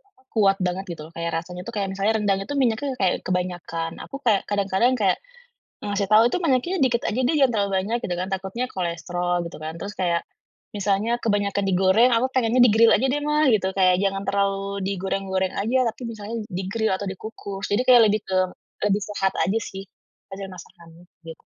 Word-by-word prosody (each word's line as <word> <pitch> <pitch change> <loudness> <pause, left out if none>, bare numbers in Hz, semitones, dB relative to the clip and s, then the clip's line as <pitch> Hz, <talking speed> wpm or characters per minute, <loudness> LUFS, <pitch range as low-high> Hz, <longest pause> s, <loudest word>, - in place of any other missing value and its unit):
apa, 400 - -33
kuat 195 -3 +3
banget 180 +2 -2
gitu 150 - -9
loh. 165 - -13
Kayak 170 0 -3
rasanya 180 +1 -8
itu 230 +6 -7
kayak 195 -2 -1
misalnya 200 +3 +1
rendang 205 -2 +1
itu 285 +9 -5
minyaknya 260 +1 0
kayak 190 -3 +1
kebanyakan, 175 -2 -3
aku 275 - -7
kayak 215 -5 +3
kadang-kadang 200 +4 +2
kayak 195 -5 +2 0.7
ngasih 205 -1 -1
tahu, 215 +3 +6
"itu - - 0
minyaknya 330 +3 +1
dikit 245 -4 +2
aja 220 - -3
deh, 315 - +1
jangan 270 -3 +4
terlalu 200 -2 +1
banyak" 225 +5 -1
gitu 180 - -2
kan, 185 - -3
takutnya 195 +5 -3
kolesterol 175 0 -2
gitu - - -10
kan. 155 +1 -5
Terus 205 +1 -6
kayak, 170 -2 +1 0.5
misalnya 205 +4 0
kebanyakan 205 -2 0
digoreng 190 +6 +4
aku 245 +3 +2
pengennya 245 -1 +2
"di-gril 225 0 +6
aja 255 +6 +2
deh 290 - +1
ma" 300 -1 +2
gitu. 210 -5 +2
Kayak 185 -2 +4
jangan 195 0 0
terlalu 200 0 0
digoreng-goreng 190 -1 -2
aja 230 +6 +1
tapi 235 - -14
misalnya 220 -1 -6
di-grill 195 +3 -2
atau 200 +1 -4
dikukus. 195 0 -7
Jadi 210 +5 +3
kayak 245 -3 +7
lebih 210 +1 +1
ke 190 - -2 0.5
lebih 205 0 +1
sehat 200 -2 -1
aja 200 +5 +1
sih, 195 -1 -7 0.5
hasil 195 0 -6
masakannya, 170 -2 -14 0.2
gitu. 165 -1 -11
200 Hz, 190 wpm, -23 LUFS, 190-230 Hz, 0.7 s, kayak